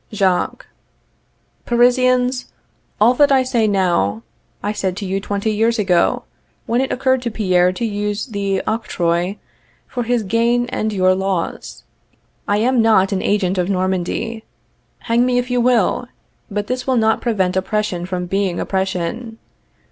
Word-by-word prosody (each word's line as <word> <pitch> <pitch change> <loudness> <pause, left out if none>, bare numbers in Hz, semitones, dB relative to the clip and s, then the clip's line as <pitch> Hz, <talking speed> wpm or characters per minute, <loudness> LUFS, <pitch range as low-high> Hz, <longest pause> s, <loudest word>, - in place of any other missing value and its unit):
] - - -41
Jacques. 190 -4 0 1.0
Parisians, 250 +1 +2 0.5
all 225 +4 +5
that 285 +2 +4
I 265 -1 +4
say 240 -4 +1
now, 170 - +1 0.4
I 205 - 0
said 190 -3 -2
to 205 - -4
you 195 +1 -2
twenty 200 +2 -2
years 225 +2 +1
ago, 185 -5 +2 0.4
when 240 +2 +1
it 265 - -2
occurred 260 0 +1
to 245 - -2
Pierre 185 -5 +2
to 230 - -3
use 205 -1 -2
the 200 -5 -2
octroi 180 -4 -1 0.5
for 245 - -4
his 240 -1 0
gain 230 +4 +1
and 215 -2 -2
your 185 -2 +3
loss. 185 - -3 0.6
I 205 - +2
am 240 +3 +2
not 215 -4 +4
an 190 -1 -1
agent 195 -2 0
of 180 +1 0
Normandy. 190 +4 -2 0.6
Hang 235 +1 +2
me 250 0 +1
if 245 0 -1
you 245 -1 +2
will, 245 0 +2 0.4
but 205 0 -2
this 255 +3 -4
will 260 -1 +2
not 220 -1 +2
prevent 190 -6 0
oppression 190 -2 -1
from 180 -1 -3
being 190 -1 -1
oppression. 190 +4 -3
210 Hz, 155 wpm, -19 LUFS, 185-240 Hz, 1.0 s, all